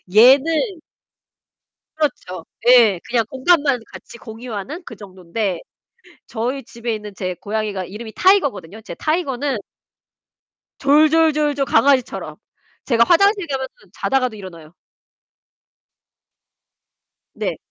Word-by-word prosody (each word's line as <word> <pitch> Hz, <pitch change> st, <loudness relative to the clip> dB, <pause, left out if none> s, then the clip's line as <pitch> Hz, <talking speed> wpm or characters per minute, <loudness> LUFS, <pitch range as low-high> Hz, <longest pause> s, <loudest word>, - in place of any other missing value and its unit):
얘는 310 Hz, -, +4 dB, 1.1 s
그렇죠. 185 Hz, -, -3 dB, 0.2 s
예. 230 Hz, -7 st, +6 dB
그냥 235 Hz, -2 st, +1 dB
공간만 280 Hz, -1 st, +2 dB
같이 235 Hz, -, -12 dB
공유하는 230 Hz, -, -7 dB
그 225 Hz, -, -9 dB
정돈데 190 Hz, -1 st, -4 dB, 0.7 s
저희 250 Hz, +4 st, -3 dB
집에 235 Hz, 0 st, -5 dB
있는 210 Hz, -1 st, -9 dB
제 185 Hz, -2 st, -3 dB
고양이가 205 Hz, 0 st, -3 dB
이름이 220 Hz, +4 st, -9 dB
타이거거든요. 285 Hz, -, +2 dB
이제 220 Hz, -, -9 dB
타이거는 285 Hz, -5 st, -1 dB, 1.2 s
졸졸졸졸 300 Hz, -1 st, +3 dB
강아지처럼. 260 Hz, +1 st, +1 dB, 0.5 s
제가 235 Hz, -3 st, +4 dB
화장실 395 Hz, +1 st, +3 dB
가면은 265 Hz, -2 st, -3 dB, 0.3 s
자다가도 255 Hz, -4 st, -1 dB
일어나요. 170 Hz, -5 st, -11 dB, 2.6 s
네. -, -, -3 dB
250 Hz, 245 characters per minute, -19 LUFS, 210-290 Hz, 2.6 s, 예